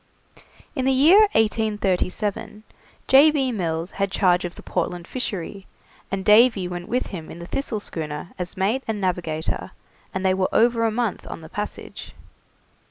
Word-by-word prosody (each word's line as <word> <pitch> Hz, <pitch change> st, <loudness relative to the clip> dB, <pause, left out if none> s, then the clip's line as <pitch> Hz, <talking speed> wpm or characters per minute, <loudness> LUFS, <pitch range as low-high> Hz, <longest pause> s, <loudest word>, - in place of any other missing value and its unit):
In 260 Hz, -3 st, -1 dB
the 265 Hz, -, +3 dB
year 300 Hz, +10 st, +6 dB
1837, 215 Hz, -1 st, 0 dB, 0.4 s
J. 275 Hz, +4 st, +7 dB
B. 275 Hz, -4 st, 0 dB
Mills 170 Hz, -4 st, -2 dB
had 200 Hz, 0 st, -1 dB
charge 185 Hz, -2 st, +2 dB
of 175 Hz, -, -6 dB
the -, -, -12 dB
Portland 175 Hz, -1 st, -3 dB
Fishery, 200 Hz, -5 st, -5 dB, 0.4 s
and 190 Hz, -1 st, -3 dB
Davy 210 Hz, -3 st, +5 dB
went 175 Hz, 0 st, -6 dB
with 250 Hz, +2 st, 0 dB
him 165 Hz, -4 st, -7 dB
in -, -, -9 dB
the 170 Hz, -, -8 dB
'Thistle' 230 Hz, +2 st, -3 dB
schooner 155 Hz, -3 st, -5 dB
as 180 Hz, 0 st, -4 dB
mate 210 Hz, +8 st, +1 dB
and 220 Hz, -2 st, -2 dB
navigator, 170 Hz, -4 st, -2 dB, 0.4 s
and 190 Hz, 0 st, -3 dB
they 190 Hz, -, +4 dB
were 185 Hz, 0 st, 0 dB
over 230 Hz, 0 st, +3 dB
a 225 Hz, -, +2 dB
month 225 Hz, -3 st, -2 dB
on -, -, -7 dB
the 160 Hz, -, -11 dB
passage. 210 Hz, +3 st, -6 dB
200 Hz, 165 wpm, -23 LUFS, 180-230 Hz, 0.4 s, J